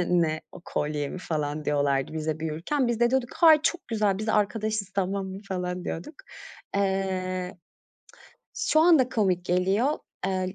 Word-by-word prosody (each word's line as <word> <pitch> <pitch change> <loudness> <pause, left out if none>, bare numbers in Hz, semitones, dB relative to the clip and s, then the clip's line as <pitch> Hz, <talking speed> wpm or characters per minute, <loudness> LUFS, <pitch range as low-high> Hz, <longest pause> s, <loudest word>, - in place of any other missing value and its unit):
"Ne 175 - -1
ne 155 -1 -1
o, - - -11
kolye 150 -1 -2
mi?" - - -6
falan 150 -3 -3
diyorlardı 140 -1 +1
bize 155 0 -3
büyürken. 165 - -1
Biz 235 -1 -1
de 240 0 +4
diyorduk, 260 -2 0
"Hayır, 320 -3 +7
çok 350 +2 -1
güzel, 210 -4 +1
biz 215 +1 -4
arkadaşız, 215 -1 0
tamam 195 0 -1
mı?" 190 0 -6
falan 180 -1 -3
diyorduk. 180 - -5 0.6
Eee, 185 -2 -1 1.0
şu 310 - +2
anda 320 -7 +5
komik 190 -8 +1
geliyor. 195 +11 +1 0.3
Eee, 185 0 -1
190 Hz, 155 wpm, -26 LUFS, 170-220 Hz, 1.0 s, Hayır